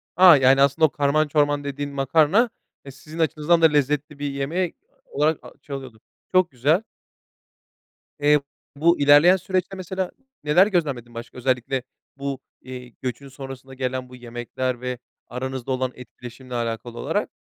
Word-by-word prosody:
A! 180 -4 +9
Yani, 135 +1 +5
aslında, 140 +3 +4
o - - +2
karman 145 +2 +1
çorman 145 -1 +1
dediğin 145 0 -4
makarna, 155 - +3 0.4
e, 135 - -8
sizin 155 +4 -11
açınızdan 160 +1 +2
da - - +7
lezzetli 150 -1 +1
bir 145 -1 -2
yemeği 160 +6 -2 0.4
olarak 150 +2 +1 0.2
çalıyordu. 135 -5 -8 0.3
Çok 185 -3 +4
güzel. 150 - +2 1.4
Eee, 150 0 +4 0.4
bu 170 +3 +3
ilerleyen 145 +6 +7
süreçte 185 +1 -2
mesela 185 0 -3 0.3
neler 175 +7 +5
gözlemledin 140 - -2
başka, 115 +2 -9
özellikle 125 0 -1 0.3
bu, 140 -1 -4 0.2
eee, 125 -1 -9
göçün 130 +2 -5
sonrasında 135 0 -10
gelen 130 -1 -3
bu 125 - -11
yemekler 120 +1 -4
ve 125 -1 -4 0.3
aranızda 130 0 -5
olan 130 0 -1
etkileşimle 125 0 -10
alakalı 115 0 -4
olarak? - - -2
140 Hz, 140 wpm, -23 LUFS, 130-155 Hz, 1.4 s, A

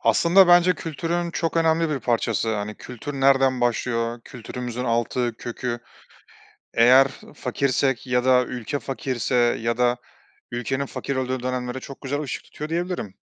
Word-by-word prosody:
Aslında 180 +2 +5
bence 175 0 +6
kültürün 170 +2 -3
çok 165 0 -2
önemli 165 0 +2
bir 140 -3 -2
parçası, 115 -1 0
hani, 105 +1 -4
kültür 125 +6 -8
nereden 135 -1 +3
başlıyor, 115 -1 0
kültürümüzün 125 0 -6
altı, 120 0 0
kökü 120 0 -4 1.0
eğer 130 +4 +6 0.3
fakirsek 135 -2 0
ya 125 -1 +1
da 130 -1 +5
ülke 125 +2 -4
fakirse 130 -2 -3 0.3
ya 115 +1 -1
da 125 0 +3 0.5
ülkenin 130 +3 -2
fakir 140 0 -4
olduğu 130 -1 -2
dönemlere 125 0 -3
çok 135 +1 -10
güzel 145 +1 -2
ışık 145 - -5
tutuyor 150 +1 -8
diyebilirim. 170 - -3
130 Hz, 140 wpm, -23 LUFS, 120-145 Hz, 1.0 s, bence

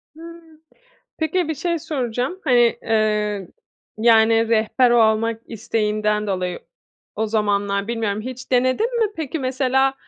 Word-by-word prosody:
Hıı. 330 -1 -13 0.6
Peki, 320 +2 0
bir 315 - -1
şey 340 +3 -2
soracağım; 260 +2 -3
hani, 240 -4 +3
eee, 210 -3 0 0.5
yani, 225 0 +4
rehber 230 +3 +3
olmak 225 -1 +2
isteğinden 210 -1 -1
dolayı 180 -2 -2 0.6
o 220 - -1
zamanlar 205 -2 0
bilmiyorum 220 -3 -2
hiç 255 +2 -8
denedin 255 - +1
mi? 445 - +3
Peki, 320 0 -4
mesela, 265 0 +1
230 Hz, 120 wpm, -21 LUFS, 215-270 Hz, 0.6 s, yani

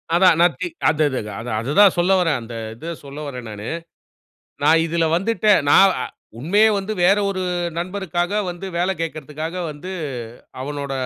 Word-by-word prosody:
அதான். 180 -1 +6
நான் 175 0 +4
தி - - 0 0.2
அந்தது 145 -3 +1
அது 105 -1 -7
அது 120 - -6
அது 120 +5 -3
தான் 205 -3 +7
சொல்ல 175 +2 +2
வர்றேன். 165 -7 +1
அந்த 115 0 -8 0.2
இத 165 +8 -6
சொல்ல 140 +1 -8
வர்றேன் 125 -4 -7
நானு. 105 +1 -7 1.0
நான் 165 0 +5
இதுல 165 0 0
வந்துட்டு 215 +3 +2 0.2
நான் 195 +4 +7
அ - - -2 0.3
உண்மையே 200 - +3
வந்து 200 +2 -4
வேற 195 +3 +5
ஒரு 190 -1 -2 0.4
நண்பருக்காக 180 0 -2 0.2
வந்து 175 +2 -6
வேலை 180 +2 +1
கேட்கறதுக்காக 155 0 -5 0.2
வந்து, 150 +6 -8 0.7
அவனோட 140 0 -4
165 Hz, 165 wpm, -21 LUFS, 145-185 Hz, 1.0 s, தான்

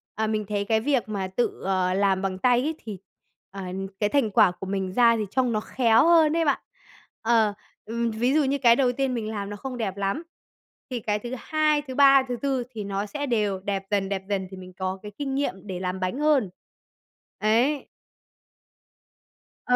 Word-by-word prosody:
à, 220 0 0
mình 215 -1 -1
thấy 205 0 -2
cái 220 +1 +2
việc 255 -2 0
mà 195 -3 -2
tự, 235 +6 -2
ờ, 185 -1 +1
làm 195 -1 +2
bằng 190 -1 -2
tay 245 +4 +3
ấy 310 +4 -2
thì, 210 -3 -6 0.5
ờ, 195 0 -7 0.4
cái 205 -1 +1
thành 250 -7 +1
quả 185 - +5
của 180 - -8
mình 190 -1 -2
ra 235 +1 +5
thì 215 - -1
trông 255 -2 +1
nó 215 - +1
khéo 230 +2 +3
hơn 325 -3 +5
đấy 330 -1 +1
bạn. 285 - +2 0.6
Ờ. 225 -2 +3 0.3
Ừm, 235 +1 -2
ví 240 +4 +1
dụ 305 0 +4
như 275 +1 +1
cái 240 -4 +5
đầu 255 -1 +2
tiên 265 0 -1
mình 220 -3 -3
làm 200 -2 -4
nó 205 - -5
không 255 +3 -6
đẹp 200 -4 -3
lắm, 200 +11 -1 0.7
thì 250 -2 -3
cái 210 -1 -1
thứ 240 +3 -7
2, 305 +2 +1
thứ 260 -3 -8
3, 275 -1 +7
thứ 245 - -2
4 270 -3 0
thì 220 -4 -5
nó 200 0 -3
sẽ 290 +7 -4
đều 210 -7 0
đẹp 195 0 -3
dần, 200 -1 +1
đẹp 190 -1 -2
dần 195 -2 -1
thì 190 - -9
mình 185 0 -11
có 185 +1 -4
cái 210 - -7
kinh 270 -2 -3
nghiệm 210 -8 -3
để 185 -2 -4
làm 185 0 -3
bánh 185 +8 -2
hơn. 295 -9 +3 0.9
Ấy. 240 +7 +2 1.8
Ờ, 250 - +3
220 Hz, 210 wpm, -25 LUFS, 195-260 Hz, 1.8 s, 3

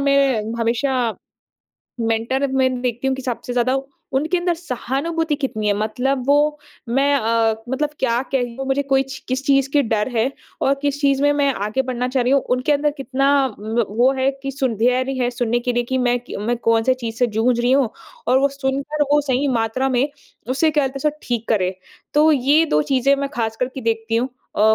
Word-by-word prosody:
मैं 275 -5 +3 0.2
हमेशा, 235 +1 0 0.9
मेंटर 230 +4 0
मैं 260 -1 +1
देखती 245 +1 -2
हूँ 265 - 0
कि 265 - -6
सबसे 245 -1 -4
ज़्यादा 250 +2 +2 0.4
उनके 315 +7 +1
अंदर 350 0 0
सहानुभूति 320 +2 -2
कितनी 255 -7 -3
है, - - +4
मतलब 250 +5 -1
वो 295 +1 +3 0.3
मैं 275 +4 +2
अ, 225 -2 +2
मतलब 290 +3 -1
क्या 240 -2 +1
कह 255 - +3
लूँ 270 - -4
मुझे 270 +1 +1
कोई 270 -1 +2
च 270 0 -8
किस 260 +2 -2
चीज़ 275 -1 +3
के 290 -1 +4
डर 220 -2 0
है 230 +4 +2 0.3
और 275 - +3
किस 285 0 -1
चीज़ 275 -1 +2
में 290 0 +4
मैं 285 -1 +2
आगे 210 +6 -1
बढ़ना 250 -1 -2
चाह 255 0 +1
रही 250 +2 +1
हूँ, 275 - +5
उनके 255 +4 0
अंदर 295 +1 +2
कितना 270 0 0 0.3
व 220 +2 -1
वो 245 +5 +3
है 265 +1 +2
कि 275 - -3
सुंध्यारी 255 0 0
है, 245 -1 +1
सुनने 240 -1 0
के 245 +1 -1
लिए 240 - +2
कि, 260 +2 -1
मैं 245 -1 +2
कि 245 - -8
मैं 235 +4 -1
कौन-से 230 +2 +2
चीज़ 230 -3 -6
से 245 - +3
जूझ 240 +1 +2
रही 245 +1 +2
हूँ 265 -5 +3 0.4
और 255 - +5
वो 280 - +3
सुनकर 275 +2 -2
वो 295 - +5
सही 275 0 0
मात्रा 240 +2 0
में 260 +1 +2 0.4
उसे, 310 +5 +2
क्या 295 -2 +2
बोलते 265 +1 -5
हैं - - +4
उसे 300 - -18
ठीक 235 -2 -2
करें। 185 -4 +1 0.4
तो 305 +2 +5
ये 285 +4 +4
2 150 - +2
चीज़ें 275 +1 +2
मैं 280 0 -2
खासकर 225 +2 -1
कि 265 - -5
देखती 225 -1 -1
हूँ 245 +3 0 0.3
अ, - - 0
260 Hz, 210 wpm, -20 LUFS, 235-275 Hz, 0.9 s, हूँ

